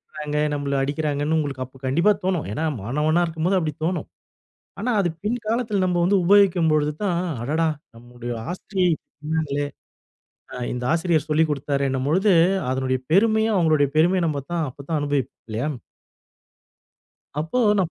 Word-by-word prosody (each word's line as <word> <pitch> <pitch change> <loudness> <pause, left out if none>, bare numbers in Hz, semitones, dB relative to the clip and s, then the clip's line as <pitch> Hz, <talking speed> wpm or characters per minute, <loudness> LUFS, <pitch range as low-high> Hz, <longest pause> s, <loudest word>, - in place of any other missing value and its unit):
திட்றாங்க, 150 -1 -5 0.2
நம்மள 145 -1 -2
அடிக்கிறாங்கன்னு 145 +2 -1
உங்களுக்கு 140 -4 -2
அப்போ 130 +2 -18
கண்டிப்பா 170 +10 +3
தோணும். 185 -5 0
ஏனா, 155 +10 -2 0.2
மாணவனா 150 - +1
இருக்கும்போது 165 +3 0
அப்படித் 155 -4 -3
தோணும். 170 -1 -1 0.7
ஆனா, 245 +5 -1
அது 175 -3 +2
பின்காலத்துல 220 -2 -1
நம்ம 180 -1 +1
வந்து 195 +3 +3
உபயோகிக்கும் 190 -4 +5
பொழுது 150 0 +1
தான், 175 -4 +1 0.2
அடடா! 160 +5 +1 0.3
நம்முடைய 120 +1 -7 0.2
ஆசிரியை 185 0 0 0.3
சொன்னாங்களே. 150 -2 -1 0.9
அ, - - -6 0.2
இந்த 125 0 -4
ஆசிரியர் 165 -2 +1
சொல்லிக் 155 +1 +3
குடுத்தாரேன்னும் 140 -2 -1
பொழுது, 190 +5 +3 0.4
அதனுடைய 130 0 0
பெருமையும், 220 +3 +3
அவங்களுடைய 155 -5 +3
பெருமைய 180 +4 +4
நம்ம 145 -3 -2
தான் 165 -2 0
அப்ப 140 +2 -12
தான் 160 -2 +1
அனுபவிப்போம் 145 -2 -2
இல்லையா? 120 +7 -1 1.7
அப்போ 160 +11 -2 0.2
நான் 180 -4 +1
155 Hz, 140 wpm, -23 LUFS, 140-180 Hz, 1.7 s, உபயோகிக்கும்